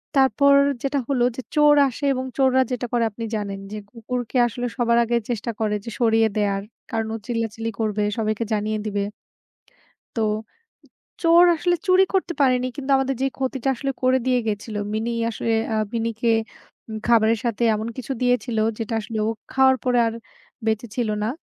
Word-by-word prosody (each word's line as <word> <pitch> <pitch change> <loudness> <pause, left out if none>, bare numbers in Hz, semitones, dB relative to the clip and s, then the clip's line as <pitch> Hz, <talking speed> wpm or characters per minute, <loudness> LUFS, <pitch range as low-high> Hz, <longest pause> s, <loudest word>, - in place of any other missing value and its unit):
তারপর 275 +1 +5 0.3
যেটা 275 0 0
হলো 260 -4 +1
যে, 260 - -5
চোর 295 0 +6
আসে 265 +3 -7
এবং 255 0 -3
চোররা 260 -1 +4
যেটা 245 0 -2
করে 235 -1 +2
আপনি 230 +3 -7
জানেন 200 -2 -4
যে, 215 - -5
কুকুরকে 245 +1 -4
আসলে 245 +2 -4
সবার 235 -1 +2
আগে 235 +1 +1
চেষ্টা 235 0 -2
করে 215 -1 0
যে - - -5
সরিয়ে 225 -1 +4
দেয়ার। 200 -1 0 0.3
কারণ 225 -1 -1
ও - - -3
চিল্লাচিল্লি 225 -1 -2
করবে, 210 -1 0
সবাইকে 215 +1 -1
জানিয়ে 215 +1 -1
দিবে 205 -1 -1 1.2
তো 225 - 0 1.0
চোর 340 +1 +7
আসলে 350 +2 +1
চুরি 370 +1 +5
করতে 370 -2 +1
পারেনি। 255 -2 +3
কিন্তু 280 -1 -5
আমাদের 270 0 0
যে - - +3
ক্ষতিটা 265 0 -2
আসলে 275 +3 -3
করে 255 +1 +4
দিয়ে 250 -1 +3
গিয়েছিল, 210 0 -3 0.2
মিনি 225 +2 -1 0.2
আসলে, 225 0 -2 0.2
আ - - +1 0.2
মিনিকে 230 0 -1 0.6
উম 220 - -5
খাবারের 225 -1 +4
সাথে 235 0 -1
এমন 215 +2 -3
কিছু 255 +1 -4
দিয়েছিল, 245 -2 +1 0.2
যেটা 225 0 -3
আসলে 220 0 -5
ও - - +1 0.2
খাওয়ার 265 0 +5
পরে 245 -1 +2
আর 225 - -2 0.5
বেঁচে 220 +2 0
ছিল 235 -3 0
না। 215 - 0
235 Hz, 175 wpm, -23 LUFS, 220-260 Hz, 1.2 s, চোর